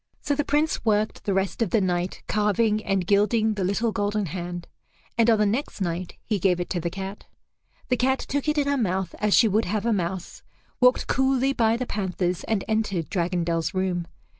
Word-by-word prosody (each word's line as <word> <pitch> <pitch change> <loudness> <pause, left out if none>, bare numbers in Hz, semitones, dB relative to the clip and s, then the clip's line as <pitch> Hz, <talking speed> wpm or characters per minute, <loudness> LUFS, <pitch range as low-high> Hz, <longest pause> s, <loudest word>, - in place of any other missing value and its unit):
So 290 - +1
the 295 +1 0
Prince 300 +3 0
worked 215 -1 0
the 200 - +1
rest 195 +4 -1
of 225 - +2
the 220 - +3
night 180 -1 -1
carving 210 +1 +1
and 195 -2 0
gilding 215 +3 +3
the 200 -2 -2
little 210 +5 0
golden 205 -1 -1
hand, 175 +1 -5 0.5
and 230 0 +4
on 225 - +5
the 210 - +3
next 225 +6 -2
night 175 -1 -3
he 210 -3 0
gave 180 -1 +2
it 175 - -4
to 180 - 0
the 170 +1 -2
cat. 195 +2 -7 0.6
The 250 - +2
cat 265 +2 +2
took 285 +2 -3
it 300 - 0
in 285 -1 +2
her 285 0 +2
mouth 190 -6 -1
as 210 -1 +3
she 230 - +6
would 215 +2 +2
have 210 +4 -2
a 235 - +2
mouse, 180 -1 -3 0.4
walked 250 0 +4
coolly 265 0 +2
by 230 -2 +2
the 255 - -2
panthers, 185 -4 -2
and 220 -4 0
entered 215 -7 -1
Dragondel's 170 -1 -1
room. 180 -2 -1
205 Hz, 205 wpm, -25 LUFS, 185-230 Hz, 0.6 s, she